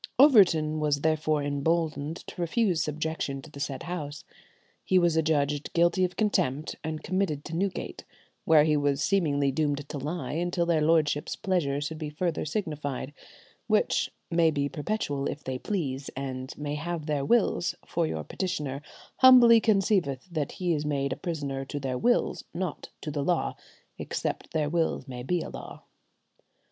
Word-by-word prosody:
Overton 175 - +6
was 145 -2 +1
therefore 155 -1 +1
emboldened 155 +1 0
to - - -7
refuse 175 0 +1
subjection 155 -2 -2
to 155 - -13
the 140 - -10
said 140 +1 -3
House. 155 -4 -5 0.6
He 185 - +3
was 175 -2 +3
adjudged 150 -2 +1
guilty 175 +2 +3
of 180 -1 0
contempt, 155 -9 0
and 155 -1 -4
committed 185 -6 -1
to 160 - -5
Newgate, 190 +2 -3 0.4
where 155 -2 +6
he 155 0 +3
was 145 -1 +1
seemingly 145 -8 +2
doomed 145 0 -1
to - - -4
lie 155 +5 -4
until 175 +2 0
their 165 -2 +2
lordships' 150 -2 +2
pleasure 170 -8 0
should 155 +1 -4
be 155 -2 -4
further 165 +2 -2
signified, 150 -6 -3 0.5
which - - +2 0.2
"may 165 -1 +4
be 145 -2 0
perpetual 145 -3 -2
if 145 - -5
they 130 -1 -4
please, 140 -9 -3
and 130 0 -5
may 145 0 -3
have 160 +1 -3
their 150 -3 -1
wills, 235 +7 +2
for - - 0
your 80 -1 -3
petitioner 150 - -3 0.4
humbly 245 -3 +8
conceiveth 195 - +1
that 155 -4 -2
he 180 -2 0
is 150 -2 -1
made 140 -2 -1
a - - -5
prisoner 140 -5 -3
to 145 - -5
their 130 -2 -2
wills, 245 0 +1
not 180 -4 -4
to 150 - -4
the 145 -1 -2
law, 175 +2 0 0.4
except - - -3
their 155 -2 0
wills 160 -3 0
may 125 -2 -6
be 170 +7 0
a - - -6
law." - - -9
155 Hz, 165 wpm, -28 LUFS, 145-175 Hz, 0.6 s, humbly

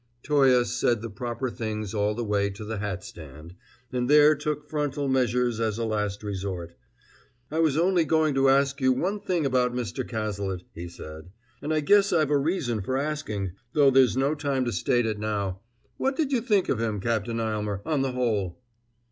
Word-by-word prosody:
Toye 135 -4 +4
said 120 -2 0
the 115 - -5
proper 120 +4 -4
things 110 -3 -4
all 105 0 0
the 120 - -3
way 100 -2 +1
to 100 +2 -8
the 110 -1 -4
hat 100 -3 -4
stand, 80 +1 -11 0.4
and 125 0 -1
there 150 +1 +7
took 150 0 -3
frontal 145 -2 -2
measures 125 -3 +1
as 110 -2 0
a 115 - -1
last 105 -2 -2
resort. 95 -4 -4 0.8
"I 160 - -1
was 155 -3 +2
only 175 +1 +3
going 155 0 +2
to 135 0 +3
ask 140 +1 +2
you 130 0 +4
one 190 +10 -1
thing 175 -6 -1
about 125 -2 +1
Mr. 125 +2 -3
Cazalet," 100 -5 -3
he 85 +1 -7
said, 80 0 -10 0.3
"and 150 - -3
I 155 -1 +2
guess 200 +6 +4
I've 155 -4 +2
a 145 - +4
reason 140 - -1
for 130 +7 -2
asking, 135 - -3 0.2
though 145 -2 +5
there's 130 -2 +4
no 135 +3 +2
time 140 -4 -1
to 120 - -1
state 120 +4 +1
it 110 -2 -2
now. 100 -3 -2 0.4
What 270 +1 0
did 290 -1 -1
you 255 -4 +2
think 210 -5 +2
of - - 0
him, 110 -3 -1
Captain 115 +2 -1
Aylmer, 105 -3 -2
on 150 -4 0
the 135 -1 -1
whole?" 110 -8 -1
125 Hz, 195 wpm, -26 LUFS, 105-145 Hz, 0.8 s, there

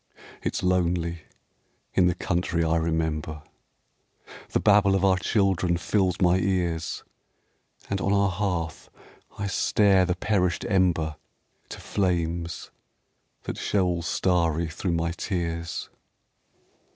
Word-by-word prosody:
It's - - -2
lonely 85 -2 0 0.7
in 90 - +4
the 90 - +1
country 85 -1 -1
I 80 0 +2
remember. 80 -2 -2 1.1
The - - +1
babble 100 -2 +4
of 95 0 +2
our 95 -1 +3
children 90 -2 +1
fills 95 0 +1
my 90 0 +4
ears, 90 -4 -1 0.8
And 100 -1 -2
on 100 - 0
our 100 -1 +3
hearth 90 -5 -3 0.5
I 100 - -3
stare 100 -1 +3
the 90 - 0
perished 95 -3 0
ember 85 -7 +1 0.5
To - - -8
flames 85 -3 -2 0.7
that - - -5
show 100 -3 +1
all 85 -1 0
starry 85 -1 +1
thro' 90 +4 -4
my 85 0 0
tears. 85 -2 -3
90 Hz, 115 wpm, -26 LUFS, 85-95 Hz, 1.1 s, in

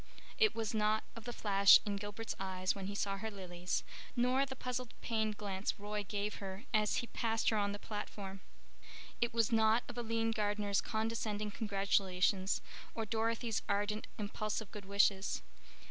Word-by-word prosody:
it 435 -2 +5
was 225 -1 -1
not 215 0 +2
of 230 -1 -9
the 240 - -3
flash 200 -4 +7
in 205 -1 -1
Gilbert's 205 +3 -4
eyes 185 -1 0
when 195 -1 -5
he 200 - -4
saw 200 -1 0
her 220 - -3
lilies, 180 -3 -3 0.3
nor 255 +3 +3
the 265 - -5
puzzled 250 -1 -3
pained 220 -2 0
glance 200 -1 -2
Roy 210 0 -3
gave 205 +1 -2
her 195 +1 -6
as 215 -1 +3
he - - 0
passed 225 -1 +1
her 220 - +2
on 200 -1 +1
the 205 - -4
platform. 200 -2 -6 0.8
It 235 - +2
was 230 -1 +2
not 220 +1 +4
of 245 0 -5
Aline 225 -1 0
Gardner's 205 -2 +1
condescending 220 -1 -1
congratulations, 195 -2 +1 0.3
or 225 - -1
Dorothy's 225 +1 0
ardent, 205 +1 0
impulsive 215 0 -3
good 205 -2 -8
wishes. 200 - +2
210 Hz, 160 wpm, -36 LUFS, 200-225 Hz, 0.8 s, flash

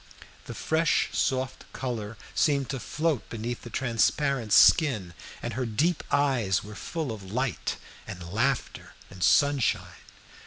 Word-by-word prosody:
The - - -6
fresh 160 +1 +1
soft 130 -1 -1
color 115 -4 -4 0.2
seemed 140 -4 +2
to 135 - -3
float 150 - -1
beneath 115 +1 -4
the 120 - -9
transparent 125 0 0
skin, 110 - +5 0.3
and 120 - -3
her 125 +2 -2
deep 150 +10 +1
eyes 130 -10 +2
were 105 +1 -9
full 155 +4 -4
of 100 -4 -8
light 130 +2 -2 0.3
and 90 -2 -8
laughter 130 +4 -1 0.2
and 95 -1 -11
sunshine. 140 +4 +3
125 Hz, 130 wpm, -27 LUFS, 105-140 Hz, 0.3 s, skin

